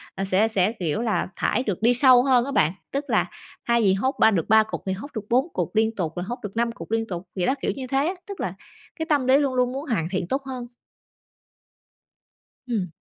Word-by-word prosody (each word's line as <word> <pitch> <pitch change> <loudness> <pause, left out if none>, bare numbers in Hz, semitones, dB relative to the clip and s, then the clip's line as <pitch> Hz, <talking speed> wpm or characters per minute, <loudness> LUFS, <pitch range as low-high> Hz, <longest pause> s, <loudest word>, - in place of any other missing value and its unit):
ờ, 195 - -3
sẽ 195 +3 +2
sẽ, 205 -2 +2
kiểu 175 +5 -1
là, 225 -3 0
thải 250 - 0
được 205 -6 -3
đi 235 +2 +4
sâu 250 0 +6
hơn 255 -3 +3
á 280 - -4
bạn. 155 - +3 0.2
Tức 280 +1 -2
là - - +3 0.4
thay 235 0 +3
vì 195 -3 +4
hốt 260 +8 0
3 220 - +6
được 170 -6 -1
3 220 +1 +6
cục 215 - -6
thì 190 - -1
hốt 200 +9 -7
được 220 -2 -4
4 255 +5 +3
cục - - -3
liên 220 +1 +2
tục, 165 -6 -2
rồi 175 - -3
hốt 240 +6 -5
được 205 0 -6
5 235 0 +1
cục 165 -3 -10
liên 225 0 0
tục, 175 -1 -6
vậy 180 - 0
đó, 260 - +2
kiểu - - 0
như 260 -2 -6
thế 275 +3 +1
á. 360 - -1
Tức 400 -1 -7
là - - -2 0.5
cái 320 - -1
tâm 290 -5 +1
lý 260 +1 +6
luôn 280 -2 +1
luôn 250 -1 +2
muốn 275 +4 -5
hoàn 175 -9 0
thiện 185 -2 -2
tốt 270 +8 -1
hơn. 255 -2 -6 2.0
Ừm. 215 -7 -1
230 Hz, 250 wpm, -24 LUFS, 195-260 Hz, 2.0 s, sâu